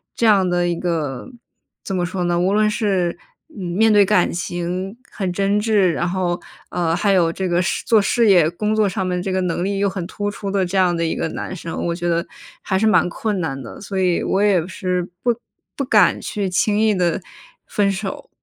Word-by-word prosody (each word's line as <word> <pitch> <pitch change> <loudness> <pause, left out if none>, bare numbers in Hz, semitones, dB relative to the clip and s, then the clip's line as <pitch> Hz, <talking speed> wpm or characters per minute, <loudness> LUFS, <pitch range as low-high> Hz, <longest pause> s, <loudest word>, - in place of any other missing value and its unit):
这 235 - 0
样 200 -4 +4
的 175 0 +1
一 175 - 0
个， 160 - -3 0.6
怎 195 - -3
么 180 - 0
说 180 0 -3
呢， 175 0 +1
无 180 +2 +2
论 215 0 +3
是 195 -6 0 0.3
面 210 - +1
对 205 -1 +6
感 185 -2 +3
情 180 +3 -3 0.2
很 190 -3 -3
真 200 +2 +1
挚， 210 -3 +3
然 175 - -1
后， 180 -1 -1 0.3
呃， 170 -2 0
还 200 +3 +1
有 170 -4 +3
这 190 0 -2
个 175 +1 +2
事 180 - -1
做 220 -2 +4
事 230 +3 +2
业 175 -5 +5
工 210 +5 -2
作 215 -1 +3
上 190 0 -2
面 180 -1 -1
这 190 - -3
个 185 - +1
能 175 -1 -1
力 200 0 -1
又 200 0 +2
很 190 -2 -4
突 205 +2 -3
出 200 0 -6
的 195 -1 +1
这 185 +2 -2
样 180 -2 +3
的 170 - -1
一 160 - 0
个 - - -1
男 - - -5
生。 165 -2 -5
我 170 - 0
觉 175 0 -3
得 170 0 0 0.4
还 190 -1 0
是 220 - +3
蛮 215 -4 +4
困 205 +1 -2
难 135 -4 -3
的。 115 - -10
所 195 -1 -4
以 180 -2 +1
我 195 - +1
也 195 -5 +3
是 180 -1 -2
不 240 -1 +2 0.4
不 280 - -2
敢 210 -8 +4
去 205 -2 -3
轻 205 +3 +1
易 220 -1 +3
地 175 -1 0 0.5
分 200 -1 +1
手。 485 - -5
185 Hz, 240 characters per minute, -20 LUFS, 175-205 Hz, 0.6 s, 对